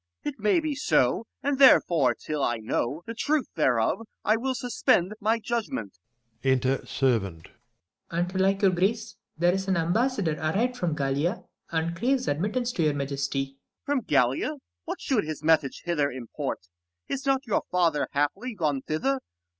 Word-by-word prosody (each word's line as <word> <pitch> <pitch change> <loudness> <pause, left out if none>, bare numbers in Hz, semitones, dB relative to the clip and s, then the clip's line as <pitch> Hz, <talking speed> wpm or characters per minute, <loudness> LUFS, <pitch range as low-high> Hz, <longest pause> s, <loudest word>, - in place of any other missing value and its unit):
It 290 -5 -4
may 210 +10 +3
be 310 -2 -2
so, 165 - +1 0.2
and 280 0 0
therefore 165 - +6
till 150 +4 -4
I 120 -3 +1
know 120 +7 -2
The 230 - -5
truth 290 +5 0
thereof, 125 - +2 0.3
I 215 - +4
will 260 +3 -1
suspend 220 -6 +1
my 220 +2 +2
judgment. 215 - -4 0.4
Enter 130 0 +2
Servant. 100 -11 0
Serv. - - -19 0.7
And't 180 +1 -1
like 195 +2 +2
your 195 - +6
grace, 195 +6 -1 0.2
there 175 +2 +3
is 190 0 -2
an 190 -1 +2
ambassador 185 - +1
Arrived 215 +11 0
from 175 -9 -1
Gallia, 145 +7 -1 0.3
and 165 +1 -1
craves 255 +7 0
admittance 210 - 0
to 180 - -2
your 150 -2 +2
majesty. 135 -1 -3 0.3
Com. 285 -1 +1
From 240 - -13
Gallia? 135 0 +2 0.3
what - - -4
should 250 -7 +1
his 155 -1 -6
message 155 -4 +2
1 175 0 0
5 - - -3
Hither 140 0 +2
import? 125 -3 -4 0.5
is 275 0 -4
not 270 +1 +2
your 220 - +1
father 170 -4 +2
haply 195 - -1
Gone 150 -7 0
thither 135 -2 -1
170 Hz, 170 wpm, -27 LUFS, 140-230 Hz, 0.7 s, therefore